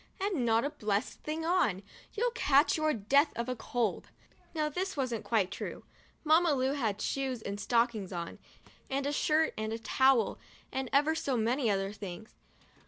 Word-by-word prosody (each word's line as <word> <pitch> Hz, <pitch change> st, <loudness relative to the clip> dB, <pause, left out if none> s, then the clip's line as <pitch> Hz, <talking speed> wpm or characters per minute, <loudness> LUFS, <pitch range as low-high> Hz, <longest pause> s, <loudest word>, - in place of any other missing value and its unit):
And 380 Hz, -11 st, 0 dB
not 225 Hz, +3 st, +3 dB
a 290 Hz, -, -2 dB
blessed 210 Hz, -4 st, -2 dB
thing 315 Hz, +1 st, -3 dB
on! 280 Hz, -, +1 dB, 0.3 s
You'll 480 Hz, +3 st, +1 dB
catch 290 Hz, -, +3 dB
your 310 Hz, -1 st, +1 dB
death 280 Hz, +6 st, +3 dB
of 245 Hz, +2 st, -2 dB
cold." 235 Hz, -1 st, -1 dB, 0.5 s
Now 305 Hz, -1 st, +1 dB
this 360 Hz, +3 st, -3 dB
wasn't 245 Hz, -5 st, -1 dB
quite 200 Hz, -5 st, +1 dB
true. -, -, -6 dB, 0.4 s
Mamma 320 Hz, 0 st, +4 dB
Lu 260 Hz, 0 st, +1 dB
had 220 Hz, -8 st, -1 dB
shoes 265 Hz, -1 st, -2 dB
and 200 Hz, 0 st, -4 dB
stockings 230 Hz, -3 st, +1 dB
on 170 Hz, -2 st, -5 dB, 0.5 s
and 275 Hz, +1 st, -1 dB
a 285 Hz, -, 0 dB
shirt 310 Hz, +2 st, +2 dB
and 220 Hz, 0 st, -2 dB
a 225 Hz, -, -2 dB
towel 250 Hz, +1 st, +2 dB, 0.3 s
and 265 Hz, -1 st, -3 dB
ever 295 Hz, +3 st, +4 dB
so 275 Hz, -5 st, -1 dB
many 235 Hz, +2 st, +1 dB
other 195 Hz, 0 st, 0 dB
things. 200 Hz, 0 st, -8 dB
255 Hz, 170 wpm, -31 LUFS, 220-300 Hz, 0.5 s, Mamma